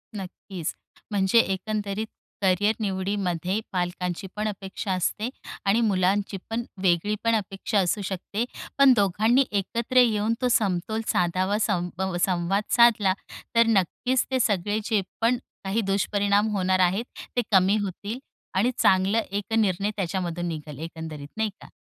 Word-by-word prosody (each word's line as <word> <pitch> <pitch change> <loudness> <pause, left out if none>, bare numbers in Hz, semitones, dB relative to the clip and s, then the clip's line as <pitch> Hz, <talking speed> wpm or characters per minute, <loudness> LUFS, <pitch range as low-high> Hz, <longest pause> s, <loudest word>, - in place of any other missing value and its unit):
नक्कीच 185 -3 -6 0.4
म्हणजे 195 +2 +4
एकंदरीत 205 +1 -1 0.3
करिअर 200 +3 +3
निवडीमध्ये 190 -2 -1
पालकांची 180 0 -2
पण 215 +1 -1
अपेक्षा 195 0 -4
असते 195 +5 -1 0.4
आणि 205 +4 +3
मुलांची 195 -1 +1
पण 230 +1 -1 0.2
वेगळी 185 +3 +2
पण 230 0 +3
अपेक्षा 200 0 -1
असू 190 +2 +1
शकते. 195 +3 -3 0.3
पण 275 -2 +7
दोघांनी 215 +6 +3
एकत्र 230 +5 -1
येऊन 220 -2 +3
तो 250 - +2
समतोल 215 0 +1
साधावा, 185 +3 +1
संब 180 -2 -1 0.2
संवाद 185 +2 0
साधला 220 -5 +5 0.4
तर 230 0 +6
नक्कीच 230 +5 +1
ते 260 - +2
सगळे 205 -2 +1
जे 215 -3 +2 0.2
पण 240 +2 +3 0.3
काही 195 +4 0
दुष्परिणाम 200 +1 +1
होणार 185 -1 +2
आहेत, 185 +5 +2 0.3
ते 245 - +3
कमी 190 +1 +5
होतील 205 +3 -4 0.4
आणि 235 +6 +3
चांगलं 195 +4 +3
एक 205 +1 -3
निर्णय 200 -2 +1
त्याच्यामधून 175 -2 -2
निघल 150 -3 -6
एकंदरीत 160 -2 -7
नाही 220 -1 +1
का. - - -11
200 Hz, 135 wpm, -25 LUFS, 185-215 Hz, 0.4 s, पण